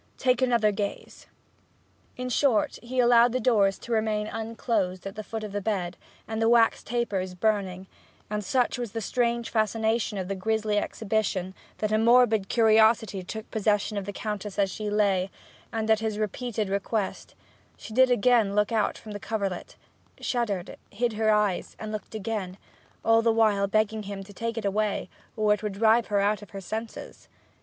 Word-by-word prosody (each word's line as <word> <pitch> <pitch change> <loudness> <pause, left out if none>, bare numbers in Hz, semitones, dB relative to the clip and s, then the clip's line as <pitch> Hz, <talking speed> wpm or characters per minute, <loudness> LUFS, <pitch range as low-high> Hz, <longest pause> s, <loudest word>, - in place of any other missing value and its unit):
Take 250 -1 +2
another 235 -4 +3
gaze.' 200 0 -5 0.9
In 250 0 -3
short, 250 -4 +2
he 250 +2 -7
allowed 240 -1 +5
the 255 - +1
doors 205 -7 +3
to 240 - -10
remain 215 -1 +1
unclosed 220 -4 -2
at 195 - -5
the 215 - -6
foot 220 +1 -5
of 210 - -5
the 205 0 -3
bed, 185 -4 -2 0.3
and 220 0 -3
the 225 - +4
wax 230 -1 +4
tapers 200 -6 -2
burning; 190 -2 -1 0.4
and 210 0 -3
such 245 +5 +1
was 235 -4 -4
the 225 - -2
strange 235 +1 -1
fascination 220 0 0
of 185 -1 -3
the 195 - -2
grisly 215 +1 0
exhibition 200 -4 -2 0.2
that 215 -1 -1
a 215 - +3
morbid 225 -3 +4
curiosity 220 -2 +4
took 220 +4 -8
possession 210 0 +1
of 200 -1 -3
the 205 - -4
Countess 210 -1 -5
as 195 -2 +2
she 210 +2 -4
lay, 200 -3 +2 0.4
and, 225 -1 -2
at 220 - +4
his 220 -1 -2
repeated 215 +1 -2
request, 200 +1 -2 0.4
she 220 - -10
did 260 +2 +5
again 235 -4 +3
look 210 +1 +2
out 220 -2 +1
from 215 - -10
the 205 - -5
coverlet, 200 -4 -3 0.4
shuddered, 210 -8 -2
hid 235 +2 -1
her 215 0 +1
eyes, 210 -3 +1
and 215 0 -6
looked 215 0 -6
again, 200 -3 -4 0.5
all 225 0 +5
the 230 0 +3
while 215 -3 +3
begging 215 +1 +1
him 200 -1 -6
to 205 +1 -13
take 230 +3 -4
it 220 - -3
away, 210 +1 -1 0.3
or 210 -1 +4
it 210 - -3
would 210 -2 -3
drive 225 +3 +3
her 205 -2 +1
out 205 +1 +1
of 205 - -12
her 195 - -7
senses. 220 +4 -7
215 Hz, 180 wpm, -27 LUFS, 200-225 Hz, 0.9 s, allowed